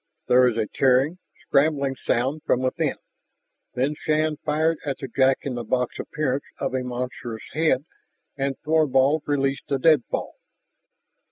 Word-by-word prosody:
There 125 Hz, 0 st, +5 dB
was 120 Hz, -2 st, 0 dB
a 110 Hz, -, +1 dB
tearing, 135 Hz, +9 st, +2 dB, 0.3 s
scrambling 140 Hz, -2 st, +2 dB
sound 135 Hz, +6 st, 0 dB
from 125 Hz, -, +1 dB
within. 130 Hz, 0 st, 0 dB, 0.8 s
Then 135 Hz, +4 st, +1 dB
Shann 155 Hz, 0 st, 0 dB
fired 155 Hz, +2 st, 0 dB
at 140 Hz, -2 st, -3 dB
the 135 Hz, -, -6 dB
jack 130 Hz, +1 st, +3 dB
in 135 Hz, -, -3 dB
the 120 Hz, -1 st, -4 dB
box 125 Hz, +2 st, -1 dB
appearance 145 Hz, -2 st, -2 dB
of -, -, -3 dB
a 130 Hz, -, 0 dB
monstrous 125 Hz, -2 st, -5 dB
head, 155 Hz, -3 st, +2 dB, 0.5 s
and 135 Hz, -1 st, -2 dB
Thorvald 150 Hz, -1 st, +3 dB
released 135 Hz, -1 st, 0 dB
the 140 Hz, -, 0 dB
deadfall. 150 Hz, -2 st, +1 dB
135 Hz, 145 wpm, -24 LUFS, 125-150 Hz, 0.8 s, There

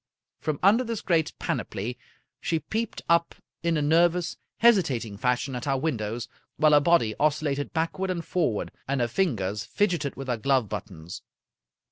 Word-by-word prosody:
From 155 Hz, -2 st, -2 dB
under 215 Hz, +6 st, +5 dB
this 230 Hz, -3 st, -3 dB
great 165 Hz, -3 st, +1 dB
panoply 115 Hz, +6 st, -3 dB, 0.4 s
she 165 Hz, -, 0 dB
peeped 220 Hz, +9 st, -3 dB
up 170 Hz, 0 st, +3 dB, 0.3 s
in 170 Hz, -1 st, +1 dB
a 150 Hz, -, 0 dB
ner 165 Hz, +4 st, +5 dB
vous, 175 Hz, 0 st, -3 dB, 0.2 s
hesitating 145 Hz, -, +3 dB
fashion 125 Hz, +4 st, 0 dB
at 125 Hz, +3 st, -5 dB
our 135 Hz, -1 st, +2 dB
windows, 120 Hz, -6 st, -2 dB, 0.3 s
while 155 Hz, -1 st, +5 dB
her 145 Hz, -, +7 dB
body 145 Hz, -7 st, +3 dB
oscillated 145 Hz, -1 st, 0 dB
backward 165 Hz, +4 st, -1 dB
and 170 Hz, -2 st, -2 dB
forward, 125 Hz, -, 0 dB, 0.2 s
and 140 Hz, 0 st, 0 dB
her 120 Hz, -, +2 dB
fingers 110 Hz, -, -1 dB
fidgeted 175 Hz, -9 st, 0 dB
with 135 Hz, -1 st, -7 dB
her 120 Hz, -2 st, 0 dB
glove 130 Hz, 0 st, +2 dB
buttons. 85 Hz, -3 st, -7 dB
145 Hz, 160 wpm, -26 LUFS, 120-170 Hz, 0.4 s, her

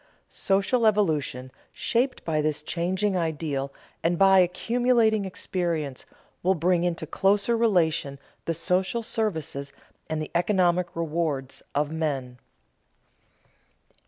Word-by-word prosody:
Social 200 Hz, +5 st, +1 dB
evolution, 155 Hz, -, 0 dB, 0.2 s
shaped 250 Hz, +3 st, -1 dB
by 155 Hz, -2 st, +1 dB
this 150 Hz, -1 st, -1 dB
changing 185 Hz, +5 st, -1 dB
ideal 150 Hz, -5 st, -2 dB, 0.3 s
and 170 Hz, +1 st, +1 dB
by 195 Hz, 0 st, +6 dB
accumulating 220 Hz, +3 st, +2 dB
experience, 170 Hz, -7 st, -3 dB, 0.3 s
will 190 Hz, +2 st, +2 dB
bring 175 Hz, +1 st, +2 dB
into 170 Hz, -2 st, -1 dB
closer 200 Hz, +7 st, +2 dB
relation 170 Hz, -10 st, +1 dB, 0.3 s
the 165 Hz, -, -1 dB
social 185 Hz, +7 st, 0 dB
services 160 Hz, -11 st, -3 dB, 0.4 s
and 155 Hz, 0 st, -1 dB
the 155 Hz, -, -5 dB
economic 175 Hz, -1 st, +2 dB
rewards 160 Hz, -5 st, -2 dB
of 145 Hz, +1 st, +1 dB
men. 135 Hz, -6 st, -3 dB
170 Hz, 105 wpm, -26 LUFS, 155-195 Hz, 0.4 s, by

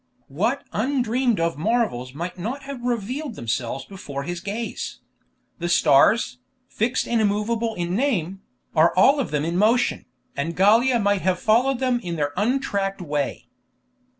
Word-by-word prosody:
what 220 Hz, -, -1 dB
undreamed 245 Hz, -1 st, +1 dB
of 165 Hz, -3 st, -1 dB
marvels 190 Hz, -, 0 dB
might 170 Hz, +3 st, -4 dB
not 235 Hz, +10 st, -5 dB
have 275 Hz, -2 st, -7 dB
revealed 245 Hz, +3 st, -3 dB
themselves 120 Hz, 0 st, -3 dB
before 145 Hz, -8 st, -7 dB
his 175 Hz, +3 st, -4 dB
gaze! 210 Hz, +5 st, -5 dB, 0.6 s
The 175 Hz, 0 st, -2 dB
stars, 150 Hz, -, +4 dB, 0.3 s
fixed 235 Hz, +2 st, -1 dB
and 235 Hz, -1 st, +1 dB
immovable 220 Hz, +2 st, 0 dB
in 175 Hz, +1 st, -2 dB
name, 195 Hz, -, -1 dB, 0.3 s
are 165 Hz, +1 st, +4 dB
all 275 Hz, +10 st, +5 dB
of 270 Hz, -, -1 dB
them 150 Hz, 0 st, -1 dB
in 170 Hz, +1 st, -1 dB
motion, 225 Hz, +5 st, +2 dB, 0.3 s
and 160 Hz, +4 st, -3 dB
Gallia 230 Hz, +6 st, +4 dB
might 205 Hz, -3 st, +1 dB
have 185 Hz, -1 st, +1 dB
followed 245 Hz, +5 st, +3 dB
them 255 Hz, -1 st, +1 dB
in 175 Hz, -7 st, -5 dB
their 145 Hz, -2 st, -1 dB
un 240 Hz, +8 st, +1 dB
tracked 200 Hz, -6 st, -2 dB
way. 150 Hz, -5 st, -3 dB
205 Hz, 150 wpm, -23 LUFS, 170-240 Hz, 0.6 s, all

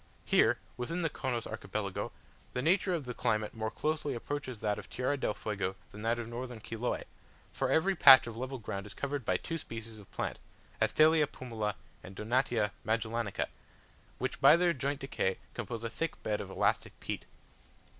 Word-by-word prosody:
Here, -, -, +4 dB, 0.2 s
within 165 Hz, +8 st, -2 dB
the 165 Hz, -, +1 dB
Chonos 120 Hz, -3 st, -2 dB
Archipelago, 100 Hz, -2 st, -3 dB, 0.4 s
the 125 Hz, -, -1 dB
nature 180 Hz, +2 st, +3 dB
of 155 Hz, -5 st, -4 dB
the 125 Hz, -, -4 dB
climate 110 Hz, -2 st, 0 dB
more 110 Hz, -1 st, -2 dB
closely 150 Hz, 0 st, -1 dB
approaches 130 Hz, -1 st, -4 dB
that 105 Hz, -1 st, 0 dB
of -, -, -10 dB
Tierra 130 Hz, +3 st, 0 dB
del 130 Hz, -6 st, -1 dB
Fuego 100 Hz, -3 st, -2 dB, 0.2 s
than 105 Hz, -, -9 dB
that 115 Hz, +2 st, +1 dB
of 120 Hz, -1 st, -4 dB
northern 120 Hz, 0 st, -5 dB
Chiloe; 115 Hz, +3 st, -2 dB, 0.5 s
for 135 Hz, -, -1 dB
every 175 Hz, +8 st, +3 dB
patch 135 Hz, -5 st, +10 dB
of 115 Hz, -2 st, -6 dB
level 130 Hz, +3 st, -4 dB
ground 100 Hz, -3 st, -5 dB
is 95 Hz, -, -10 dB
covered 140 Hz, -1 st, -2 dB
by 95 Hz, -3 st, +2 dB
two 165 Hz, -, -4 dB
species 115 Hz, -4 st, -7 dB
of 100 Hz, -, -14 dB
plants -, -, -3 dB, 0.4 s
(Astelia 155 Hz, -1 st, +5 dB
pumila 110 Hz, -6 st, -3 dB, 0.3 s
and 95 Hz, -, -10 dB
Donatia 115 Hz, -1 st, +1 dB
magellanica), 110 Hz, -1 st, 0 dB, 0.7 s
which -, -, -3 dB
by -, -, +9 dB
their 175 Hz, -1 st, +4 dB
joint 140 Hz, 0 st, -2 dB
decay 115 Hz, -8 st, 0 dB, 0.2 s
compose 115 Hz, 0 st, -4 dB
a -, -, 0 dB
thick 165 Hz, +6 st, -3 dB
bed 105 Hz, -1 st, 0 dB
of -, -, -7 dB
elastic -, -, 0 dB
peat. -, -, -4 dB
120 Hz, 175 wpm, -32 LUFS, 110-140 Hz, 0.7 s, patch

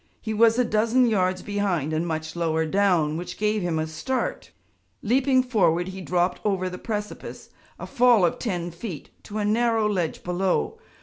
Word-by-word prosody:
He 220 Hz, -, -4 dB
was 225 Hz, +1 st, +4 dB
a 250 Hz, -, +3 dB
dozen 230 Hz, +3 st, +2 dB
yards 185 Hz, -5 st, +1 dB
behind 190 Hz, -7 st, -1 dB
and 160 Hz, +2 st, -1 dB
much 160 Hz, 0 st, -4 dB
lower 160 Hz, -1 st, 0 dB
down, 165 Hz, -4 st, +2 dB
which 175 Hz, +1 st, -6 dB
gave 210 Hz, 0 st, 0 dB
him 175 Hz, -3 st, -1 dB
a 155 Hz, -, 0 dB
start. 260 Hz, -, -3 dB, 0.5 s
Leaping 260 Hz, +3 st, +3 dB
forward, 185 Hz, -8 st, +1 dB
he 190 Hz, 0 st, -7 dB
dropped 180 Hz, 0 st, 0 dB
over 185 Hz, -3 st, 0 dB
the 180 Hz, -, -7 dB
precipice, 210 Hz, -2 st, -6 dB, 0.3 s
a -, -, -7 dB
fall 240 Hz, -6 st, +4 dB
of 170 Hz, -, -1 dB
ten 175 Hz, -7 st, -3 dB
feet, 170 Hz, -1 st, -8 dB
to 210 Hz, -, -6 dB
a 210 Hz, -, 0 dB
narrow 225 Hz, 0 st, +2 dB
ledge 180 Hz, -6 st, -2 dB
below. 185 Hz, -, -1 dB
195 Hz, 175 wpm, -25 LUFS, 175-225 Hz, 0.5 s, was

